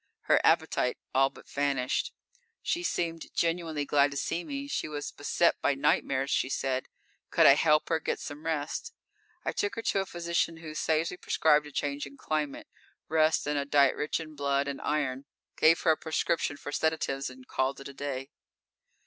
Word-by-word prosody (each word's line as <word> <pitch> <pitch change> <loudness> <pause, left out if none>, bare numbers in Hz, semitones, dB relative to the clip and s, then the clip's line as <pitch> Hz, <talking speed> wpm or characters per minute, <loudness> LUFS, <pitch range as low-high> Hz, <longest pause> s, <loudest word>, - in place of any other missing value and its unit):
Her - - +3
appetite - - +2 0.2
all 135 +1 +4
but - - -16
vanished. 140 -3 0 0.5
She 345 - 0
seemed 165 - -2
genuinely 165 -3 0
glad 145 0 +4
to 140 - -6
see 170 +4 -1
me. 280 +4 -5
She 285 - -2
was 145 -1 -5
beset 170 +4 +1
by 145 - +2
nightmares, 135 0 +1
she 130 - +1
said. 130 -1 -1 0.4
Could - - +4
I - - +10
help 150 +1 +3
her 165 - +2
get - - -2
some 150 +2 -7
rest? 160 - -3 0.5
I - - +1
took 205 - -1
her 230 - -4
to 200 - +1
a 195 - -2
physician 170 -1 -1
who 160 -2 -8
sagely 160 +3 0
prescribed 150 -3 +3
a - - -11
change 145 0 -2
in 140 0 -14
climate, 150 -2 -2 0.4
rest 160 0 +3
and 145 0 0
a - - 0
diet 140 -1 +4
rich 150 - -1
in 155 -1 -8
blood 140 -1 0
and 140 -1 -4
iron, 140 -3 -1 0.3
gave 165 +1 +5
her 165 - +4
a 155 - +2
prescription 160 -2 -1
for 145 - -7
sedatives, 145 -4 -1
and 130 0 -14
called 130 +1 -1
it 140 - -8
a 140 - -9
day. 135 0 -5
150 Hz, 185 wpm, -29 LUFS, 140-160 Hz, 0.5 s, I